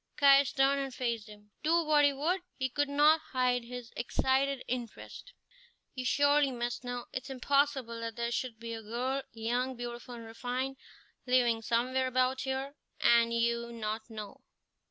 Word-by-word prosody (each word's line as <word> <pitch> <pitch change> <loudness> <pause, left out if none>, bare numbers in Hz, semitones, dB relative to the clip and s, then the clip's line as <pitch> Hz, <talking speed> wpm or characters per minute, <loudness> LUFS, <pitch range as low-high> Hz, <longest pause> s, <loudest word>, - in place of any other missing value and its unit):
Caius 280 -1 +6
turned 275 +1 +3
and 270 -1 -4
faced 235 -4 -3
him. 210 0 -15
Do 335 +2 +3
what 300 -1 +4
he 285 - +5
would, 320 +7 0 0.2
he 265 -1 -1
could 290 +2 0
not 300 +3 +5
hide 250 -1 +2
his 245 0 -8
excited 265 +2 0
interest. 245 - -6 0.6
"You 255 -1 -5
surely 285 +2 +4
must 240 0 -3
know. 245 0 -4
It 255 - -4
is - - -9
impossible 265 -2 +1
that 230 -1 -5
there 235 0 -2
should 240 -1 -2
be 230 0 -6
a 225 - -5
girl, 250 +5 -2
young, 245 +3 -1
beautiful 240 0 -7
and 230 -1 -9
refined, 250 +4 -3 0.5
living 240 -3 +3
somewhere 250 +3 +1
about 255 +1 +1
here, 265 +1 -3 0.3
and 235 0 +5
you 235 0 0
not 220 0 -4
know." 215 -3 -8
250 Hz, 165 wpm, -31 LUFS, 235-275 Hz, 0.6 s, Caius